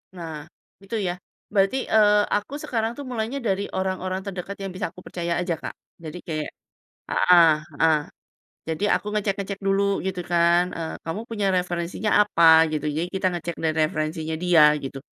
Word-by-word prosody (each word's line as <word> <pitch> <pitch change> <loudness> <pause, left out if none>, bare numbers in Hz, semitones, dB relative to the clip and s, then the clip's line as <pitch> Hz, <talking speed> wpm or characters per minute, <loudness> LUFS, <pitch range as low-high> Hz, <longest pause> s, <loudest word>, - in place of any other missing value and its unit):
Nah, 165 -3 -6 0.5
itu 225 +4 -5
ya. 175 - -1 0.4
Berarti, 195 +4 +3 0.2
eee, 210 -1 +6 0.2
aku 205 +6 -3
sekarang 225 -2 -1
tuh 285 - -6
mulainya 235 +3 -3
dari 195 0 0
orang-orang 185 0 -2
terdekat 195 0 -6
yang 195 - -4
bisa 205 +1 -2
aku 180 - -12
percaya 170 -1 -3
aja 180 -1 -1
Kak. - - -5 0.3
Jadi 155 +2 -7
kayak 155 -2 -3 0.6
heeh 175 -2 +6 0.3
heeh, 160 -1 +5 0.7
jadi 160 +5 -2
aku - - -18
ngecek-ngecek 200 -1 -2
dulu 195 0 +2 0.2
gitu 185 -2 -2
kan, 170 0 +4 0.2
eee, 165 -1 -4
"Kamu 165 +7 -3
punya 210 -3 -2
referensinya 180 +3 -2
apa?" 185 -5 +1 0.3
Gitu. 150 -1 -2
Jadi 170 +2 -1
kita 190 -1 +1
ngecek 170 -1 -4
dari 160 -1 +1
referensinya 155 0 -3
dia 175 -3 +5 0.2
gitu. 135 0 -6
180 Hz, 165 wpm, -24 LUFS, 165-200 Hz, 0.7 s, eee